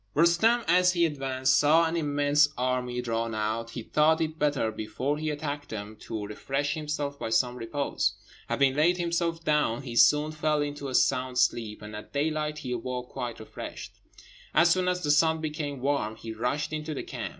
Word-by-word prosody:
Roostem, 170 +9 +4
as 180 +2 +4
he 170 -1 +3
advanced, 135 -3 0
saw 160 +3 +5
an 165 +1 -1
immense 145 -1 +3
army 125 -1 -1
drawn 115 -1 -2
out; 110 +2 -2
he 115 0 -6
thought 155 +5 +3
it 160 0 -2
better, 145 -7 +1
before 130 +7 -3
he 155 0 -2
attacked 145 -1 -4
them, 105 0 -6
to 110 -1 -5
refresh 135 +7 -2
himself 150 -2 -3
by - - -3
some 120 +2 +2
repose. 125 +4 -1 0.4
Having 135 -1 +2
laid 170 +4 +3
himself 170 -1 -1
down, 150 -5 +1
he 120 -3 -6
soon 150 +5 +5
fell 155 -1 0
into 145 -1 -5
a 130 - -3
sound 130 -1 +2
sleep, 115 -3 0
and 105 0 -8
at 105 - -10
daylight 150 +1 -1
he 130 -4 -6
awoke 125 +1 -4
quite 120 -2 -5
refreshed. 110 - -9 0.6
As 170 +1 +6
soon 185 +1 +2
as 180 0 0
the 145 - +2
sun 160 +2 +4
became 150 -3 -4
warm, 135 -6 0
he 110 0 -7
rushed 140 +7 -2
into 155 0 -4
the - - -4
camp. - - -5
145 Hz, 185 wpm, -28 LUFS, 125-155 Hz, 0.6 s, As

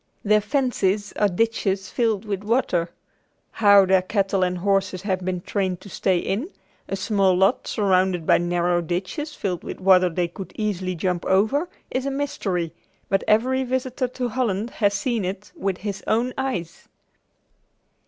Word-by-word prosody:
Their 210 0 +4
fences 210 -5 0
are 210 - +2
ditches 195 -1 -1
filled 225 -3 0
with 200 -2 -3
water. 205 -7 +1 0.6
How 200 -2 +6
their 190 0 +4
cattle 195 0 0
and 180 0 +1
horses 190 0 0
have 185 -2 -1
been 180 -1 -2
trained 185 -2 -2
to 200 - -11
stay 185 0 +1
in, 215 - -2 0.4
a - - -1
small 195 -1 +2
lot 195 +6 +2
surrounded 185 -4 +1
by - - +5
narrow 175 0 +1
ditches 185 - -4
filled 180 -3 -3
with - - -7
water 185 -1 +5
which 165 - -12
they 175 -1 +1
could 185 +3 -9
easily 190 -4 -2
jump 180 +1 -1
over, 220 - +2 0.2
is 260 +1 -1
a - - +1
mystery, 210 - -2 0.4
but 195 - +1
every 255 +5 +3
visitor 255 0 -1
to 250 0 -3
Holland 225 -2 -1
has 205 -2 +1
seen 230 +1 -1
it 190 +3 -5
with 195 -2 -2
his 200 -1 -5
own 240 +3 +1
eyes. 185 -11 -4
195 Hz, 165 wpm, -23 LUFS, 185-225 Hz, 0.6 s, How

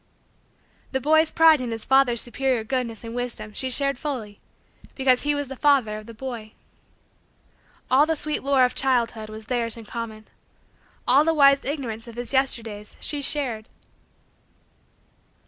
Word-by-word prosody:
The 265 - +1
boy's 315 +3 +3
pride 320 -3 +5
in 250 - -4
his 225 -1 -4
father's 265 -3 +4
superior 250 -1 -1
goodness 235 -2 -3
and 230 0 -7
wisdom 235 -3 -3
she 260 +4 -3
shared 275 0 0
fully 230 -9 -5 0.6
because 260 -2 +4
he 295 0 +1
was 285 -1 -3
the 270 - -7
father 255 -7 +2
of 215 - -14
the 230 - -9
boy. 230 -3 -7 1.4
All 280 +4 +5
the 320 - +1
sweet 300 0 -2
lore 270 -1 +3
of 250 - -2
childhood 235 -5 0
was 215 0 -9
theirs 235 -1 0
in 225 - -10
common. 220 -1 -7 0.8
All 275 +4 +5
the 325 +1 +1
wise 275 -2 +5
Ignorance 245 -6 -4
of 230 - -10
his 245 +2 -3
Yesterdays 225 -6 -2
she 295 -1 -2
shared. 255 -6 -1
250 Hz, 155 wpm, -24 LUFS, 225-275 Hz, 1.4 s, pride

